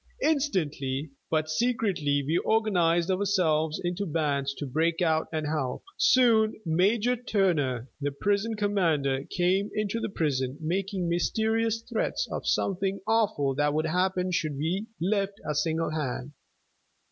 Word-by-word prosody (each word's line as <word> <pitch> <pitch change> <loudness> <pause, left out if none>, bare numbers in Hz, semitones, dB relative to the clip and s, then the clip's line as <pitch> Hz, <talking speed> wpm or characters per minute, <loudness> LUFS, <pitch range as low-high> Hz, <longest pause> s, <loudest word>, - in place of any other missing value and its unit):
Instantly, 155 - 0 0.2
but 155 -1 +1
secretly, 155 -6 0
we 160 +5 +1
organized 180 -6 +2
ourselves 175 -6 +1
into 180 +3 -2
bands 145 -3 0
to 145 - -5
break 160 +5 0
out 160 -3 +2
and 155 -2 -2
help. 150 -4 -2
Soon 225 -4 +4
Major 205 +9 +2
Turner, 165 - 0
the 145 - 0
prison 205 +9 0
commander, 160 -10 +1
came 185 +3 +1
into 215 +1 -1
the - - -3
prison, 135 -7 -1
making 185 +3 -2
mysterious 220 +6 0
threats - - -1
of - - -4
something 195 0 0
awful 205 -12 +1
that 145 +2 +1
would 155 +1 +1
happen 180 +2 0
should 155 -4 -1
we 180 +9 -2
lift 200 +2 0
a 150 - 0
single 160 +2 0
hand. 140 -3 -3
175 Hz, 135 wpm, -27 LUFS, 150-205 Hz, 0.2 s, Soon